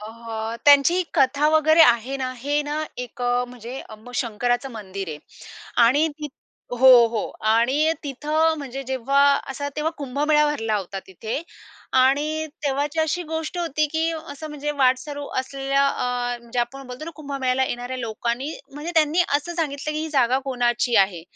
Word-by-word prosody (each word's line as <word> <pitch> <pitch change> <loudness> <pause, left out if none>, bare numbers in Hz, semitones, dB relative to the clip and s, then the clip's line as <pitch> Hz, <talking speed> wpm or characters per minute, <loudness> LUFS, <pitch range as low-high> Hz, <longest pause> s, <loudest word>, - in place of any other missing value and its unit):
अ, 210 - -8 0.6
त्यांची 290 +6 +6
कथा 280 +3 +3
वगैरे 315 +1 +4
आहे 240 0 +3
ना. 255 -1 -3
हे 290 +4 0
ना 300 +1 -3
एक 250 0 -6
अ, 245 0 +1
म्हणजे 245 +2 -8
अप 220 +3 -12
शंकराचं 245 +3 -1
मंदिर 195 -4 -6
आहे 150 -1 -6 0.7
आणि 295 +6 +3
ति 300 -1 -5 0.5
हो, 265 - +7 0.2
हो 225 -2 -2 0.3
आणि 270 +8 +3
तिथं 305 +4 +1
म्हणजे 275 -1 -6
जेव्हा 265 +2 +1 0.3
असा 285 +1 -4
तेव्हा 305 +1 0
कुंभमेळा 295 +2 +2
भरला 225 -7 -1
होता 195 0 -5
तिथे 220 - -5 0.6
आणि 305 +4 +1 0.2
तेव्हाची 285 +3 0
अशी 315 +3 0
गोष्ट 320 +2 -3
होती 305 -3 0
की 325 +1 +1
असं 310 -1 -7
म्हणजे 295 0 -4
वाटसरू 270 +3 +1
असलेल्या 275 +1 0
अ, 245 -2 -2
म्हणजे 235 +1 -6
आपण 265 +3 -4
बोलतो 250 +5 -7
ना 335 - -6
कुंभमेळ्याला 265 -3 -1
येणाऱ्या 245 +1 -4
लोकांनी 235 +5 -3 0.2
म्हणजे 305 +4 -6
त्यांनी 320 +2 +4
असं 345 +4 -6
सांगितलं 305 -2 -2
की, 305 - -3
"ही 315 - -3
जागा 260 -3 +3
कोणाची 245 -2 +1
आहे?" 175 -4 -9
275 Hz, 155 wpm, -23 LUFS, 245-300 Hz, 0.7 s, हो